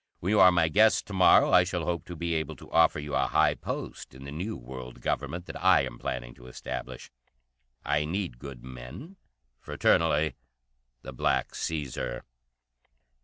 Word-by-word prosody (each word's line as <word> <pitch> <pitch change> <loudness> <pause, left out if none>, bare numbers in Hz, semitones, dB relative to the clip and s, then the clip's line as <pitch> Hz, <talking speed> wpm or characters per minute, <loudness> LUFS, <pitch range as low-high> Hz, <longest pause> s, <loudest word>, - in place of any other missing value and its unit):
When 95 - -2
you 105 - +4
are 95 -1 +8
my 85 -2 +3
guest 110 +6 +4
to 100 - -9
morrow 95 -1 +5
I 90 - +7
shall 90 -2 -3
hope 85 0 -2
to 90 - -8
be 85 0 -2
able 80 -1 -2
to - - -15
offer 80 -2 +4
you 75 -1 -6
a 65 -1 +2
high - - +3
post - - -7
in 65 - -11
the 70 - -8
new 90 +9 -4
World 65 0 -9
Government 85 +1 -3
that - - -8
I - - +6
am - - -7
planning - - -4
to 60 - -13
establish. 65 - -7 0.7
I 75 - +1
need 85 -7 -3
good 65 -3 -9
men. 65 - -10 0.4
Fraternally, 80 -1 +2 0.7
the 65 - -8
Black 60 - 0
Caesar." 70 -6 -4
80 Hz, 170 wpm, -28 LUFS, 65-90 Hz, 0.7 s, are